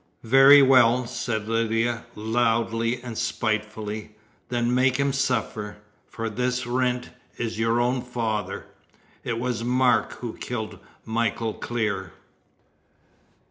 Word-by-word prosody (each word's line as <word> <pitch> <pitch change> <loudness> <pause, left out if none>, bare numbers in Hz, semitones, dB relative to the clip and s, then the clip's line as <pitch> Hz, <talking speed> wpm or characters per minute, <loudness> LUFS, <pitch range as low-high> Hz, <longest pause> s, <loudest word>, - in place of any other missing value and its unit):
"Very 135 +4 +8
well," 125 -2 +5
said 115 -2 -3
Lydia, 115 +1 0
loudly 115 +1 0
and 120 -2 -6
spitefully, 110 -2 -3 0.3
"then 120 0 0
make 130 0 +3
him 140 0 +1
suffer, 110 -6 -1 0.3
for 115 0 -5
this 125 +3 -1
Wrent 125 0 -1 0.3
is 115 -2 -3
your 115 +1 +2
own 125 +1 +1
father! 110 -6 -3 0.6
It 115 - -2
was 120 -1 -2
Mark 125 0 +2
who 120 -2 -6
killed 110 -5 -5 0.3
Michael 115 0 -1
Clear!" 100 -8 -3
115 Hz, 110 wpm, -25 LUFS, 110-125 Hz, 0.6 s, Very